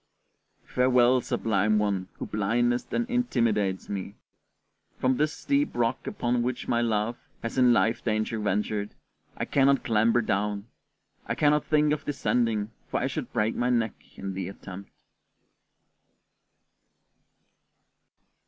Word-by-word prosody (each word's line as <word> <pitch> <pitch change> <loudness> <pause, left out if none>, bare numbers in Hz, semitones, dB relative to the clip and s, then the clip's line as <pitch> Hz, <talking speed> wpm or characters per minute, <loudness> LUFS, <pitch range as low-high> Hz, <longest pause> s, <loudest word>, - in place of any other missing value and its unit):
Farewell, 125 0 +3
sublime 105 -2 +1
one 100 -3 0
who - - -6
blindest 120 +4 0
and 240 0 0
intimidatest 115 - 0
me! 100 0 -5 0.8
From 130 0 +2
this 150 +1 +2
steep 285 - 0
rock 115 -1 0
upon 120 0 0
which 125 0 -3
my 120 - +2
love 115 0 0 0.3
has 115 - -4
in 125 -1 +6
life 115 -1 +2
danger 110 0 -1
ventured, 105 0 -1 0.4
I - - -2
cannot 140 0 +3
clamber 115 +1 +3
down. 105 0 -1 0.6
I - - -1
cannot 150 0 +3
think 150 -1 +3
of 150 - -3
descending, 115 -6 0 0.2
for - - 0
I - - -1
should - - -4
break 105 +1 +1
my 125 - 0
neck 115 -3 +1 0.2
in 95 0 -4
the 95 -1 -4
attempt. 100 0 -9
115 Hz, 125 wpm, -27 LUFS, 105-125 Hz, 0.8 s, in